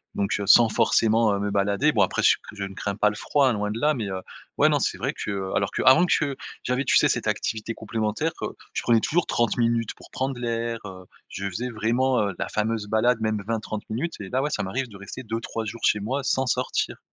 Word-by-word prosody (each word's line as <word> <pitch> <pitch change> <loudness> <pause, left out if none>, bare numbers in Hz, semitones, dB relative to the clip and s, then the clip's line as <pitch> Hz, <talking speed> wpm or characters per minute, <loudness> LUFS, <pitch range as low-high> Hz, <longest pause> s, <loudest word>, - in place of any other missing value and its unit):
donc, 100 -1 -1
heu, 100 - -3
sans 115 +2 +7
forcément, 110 0 +3
heu, - - -2
me 100 0 -2
balader. 100 +9 +2
Bon 110 - +2
après 95 - +1
je - - +7
sais - - +3
que - - -10
je 100 - -4
ne 95 0 -5
crains 100 +1 -3
pas 105 +1 +3
le - - -8
froid, 135 +4 +2
loin 105 -1 -2
de 110 +2 -4
là, 150 +5 +3
mais, 115 -7 -3
heu, 95 -1 -4 0.4
ouais - - +5
non - - +2
c'est - - -1
vrai - - -2
que 95 -2 -4
alors 100 -1 +1
que - - -2
avant 160 +8 +6
che 145 -5 +1 0.3
j'avais, 125 +2 0
tu 130 - +4
sais, - - +5
cette - - -1
activité 110 +1 -2
complémentaire, 110 +8 -2
heu, - - -3 0.2
je - - -1
prenais 115 -2 +3
toujours 170 +7 +1
30 120 0 +1
minutes 115 -2 +1
pour - - -16
prendre 130 -1 -3
l'air, 115 -1 -2
heu, 95 -2 -9 0.2
je 100 - -5
faisais 115 +7 -4
vraiment, 120 +3 +1
heu, 100 - -3
la - - -2
fameuse 110 0 -1
balade 110 +2 +2
même 110 -1 0
20-30 110 -1 -3
minutes. 160 +10 -2
Et 100 -2 -7
là 130 +5 0
ouais, 145 - -1
ça 150 - -2
m'arrive 125 +8 -2
de 100 - -11
rester 100 +6 -8
2-3 115 -1 -4
jours 115 +2 -7
chez 105 - +3
moi 130 +7 -2
sans 130 0 +1
sortir. - - -1
115 Hz, 250 wpm, -25 LUFS, 105-125 Hz, 0.4 s, sans